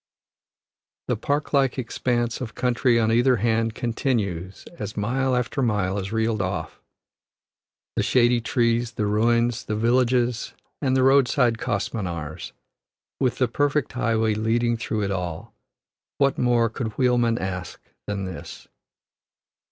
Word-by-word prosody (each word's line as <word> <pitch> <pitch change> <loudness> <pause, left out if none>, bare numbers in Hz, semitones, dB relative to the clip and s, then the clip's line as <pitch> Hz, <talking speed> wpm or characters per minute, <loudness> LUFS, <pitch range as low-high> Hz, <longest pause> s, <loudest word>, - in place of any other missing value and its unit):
The - - +2
park 145 +2 -2
like 135 -2 +2
expanse 120 -1 -1
of 120 -3 -6
country 125 -1 +2
on 110 0 +2
either 120 +3 +4
hand 115 0 0
continues 100 -7 -2
as 105 0 -5
mile 130 +5 0
after 125 +3 -1
mile 105 -5 0
is 95 +1 -5
reeled 110 -1 0
off; 90 -3 -4 1.1
the - - +1
shady 120 -1 +3
trees, 115 +1 +1
the 105 - -1
ruins, 115 +3 +2
the 105 - -3
villages, 120 +1 +1 0.3
and 130 -2 +2
the 130 - +3
roadside 130 -3 +3
kos 105 -5 -1
minars, 85 -8 -5 0.7
with 130 -3 +1
the 130 - +2
perfect 145 0 0
highway 115 -2 +1
leading 115 +2 +1
through 110 -2 -2
it 100 - -1
all 90 -4 -4 0.6
what 140 -1 +2
more 120 -1 +2
could 115 -1 -4
wheelman 120 -2 +2
ask 90 -3 -5 0.3
than 100 -1 -3
this. 95 -3 -8
115 Hz, 135 wpm, -24 LUFS, 105-125 Hz, 1.1 s, either